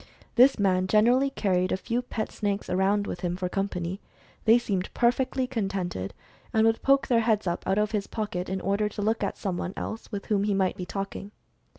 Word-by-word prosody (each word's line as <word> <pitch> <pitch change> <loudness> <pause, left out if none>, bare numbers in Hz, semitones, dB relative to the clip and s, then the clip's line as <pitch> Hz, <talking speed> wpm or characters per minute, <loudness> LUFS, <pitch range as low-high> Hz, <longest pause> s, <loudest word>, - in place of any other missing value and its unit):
This 255 +3 +6
man 185 -2 +2
gen 210 +2 +4
erally 265 +3 +3
carried 185 -2 +1
a - - +1
few 235 +5 -2
pet 230 -3 -4
snakes 200 -2 -2
around 195 +2 +2
with 175 - -5
him 175 -1 -1
for 185 -1 -2
company. 190 -1 -3 0.4
They 225 +1 +7
seemed 195 -6 -2
perfectly 255 +2 +2
contented, 195 - -3 0.4
and 220 0 +3
would 225 0 +2
poke 275 0 +4
their 235 -2 +3
heads 220 -3 +1
up 175 -1 -2
from 190 - +1
out - - 0
of 210 0 +1
his 205 -3 -1
pocket, 190 -5 -3
in 190 0 -2
order 200 +2 0
to 205 - -6
look 220 +2 +1
at - - -2
some 190 -4 -2
one 180 +2 -4
else 225 - -5
with 200 -2 -4
whom 205 -2 +1
he 205 -1 +1
might 190 -1 +1
be 180 - -6
talking. 195 0 -5
205 Hz, 220 wpm, -27 LUFS, 190-225 Hz, 0.4 s, They